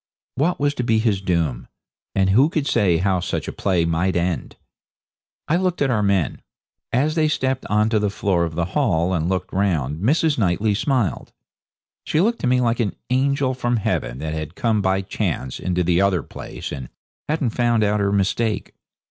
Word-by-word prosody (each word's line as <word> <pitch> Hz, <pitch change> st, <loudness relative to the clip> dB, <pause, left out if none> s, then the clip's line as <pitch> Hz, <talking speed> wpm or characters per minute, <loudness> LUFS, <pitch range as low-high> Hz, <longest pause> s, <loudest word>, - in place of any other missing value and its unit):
What 160 Hz, +7 st, 0 dB
was 145 Hz, 0 st, +1 dB
to 125 Hz, -, -3 dB
be 115 Hz, -2 st, +2 dB
his 110 Hz, -4 st, +1 dB
doom? 85 Hz, -9 st, -1 dB, 0.5 s
And 95 Hz, -1 st, +3 dB
who 130 Hz, +9 st, +5 dB
could 155 Hz, -4 st, -1 dB
say 100 Hz, -, +2 dB
how 95 Hz, +1 st, +1 dB
such 90 Hz, -, -3 dB
a -, -, -3 dB
play 90 Hz, -4 st, +1 dB
might 85 Hz, +3 st, 0 dB
end? 85 Hz, 0 st, -1 dB, 0.9 s
I 165 Hz, -, +2 dB
looked 180 Hz, -1 st, 0 dB
at 135 Hz, -2 st, +2 dB
our 110 Hz, -3 st, +1 dB
men. 100 Hz, -5 st, 0 dB, 0.5 s
As 145 Hz, +6 st, +1 dB
they 155 Hz, -1 st, +2 dB
stepped 130 Hz, -3 st, -1 dB
on 105 Hz, +1 st, +2 dB
to 110 Hz, -1 st, +2 dB
the 105 Hz, -1 st, +1 dB
floor 95 Hz, -3 st, 0 dB
of 80 Hz, -2 st, -3 dB
the 85 Hz, 0 st, 0 dB
hall 95 Hz, -, +1 dB
and 85 Hz, -1 st, 0 dB
looked 95 Hz, -1 st, -2 dB
round 80 Hz, -6 st, 0 dB
Mrs. 150 Hz, -, +2 dB
Knightley 105 Hz, +2 st, +1 dB
smiled. 120 Hz, -, -1 dB, 0.7 s
She 155 Hz, -, 0 dB
looked 230 Hz, +6 st, +2 dB
to -, -, -1 dB
me 125 Hz, 0 st, +3 dB
like 115 Hz, 0 st, +1 dB
an 110 Hz, -4 st, 0 dB, 0.2 s
angel 135 Hz, 0 st, +2 dB
from 120 Hz, -1 st, 0 dB
heaven -, -, -2 dB
that 80 Hz, +2 st, -4 dB
had 80 Hz, +1 st, -5 dB
come 110 Hz, -3 st, +1 dB
by 95 Hz, 0 st, +1 dB
chance 65 Hz, -8 st, -3 dB
into 90 Hz, 0 st, 0 dB
the 90 Hz, +1 st, +2 dB
other 95 Hz, -5 st, +2 dB
place -, -, -8 dB
and 65 Hz, -4 st, -6 dB, 0.4 s
hadn't 150 Hz, -6 st, 0 dB
found 120 Hz, -1 st, +2 dB
out 105 Hz, 0 st, +1 dB
her 100 Hz, -1 st, +1 dB
mistake. 100 Hz, +2 st, 0 dB
105 Hz, 190 wpm, -22 LUFS, 90-125 Hz, 0.9 s, who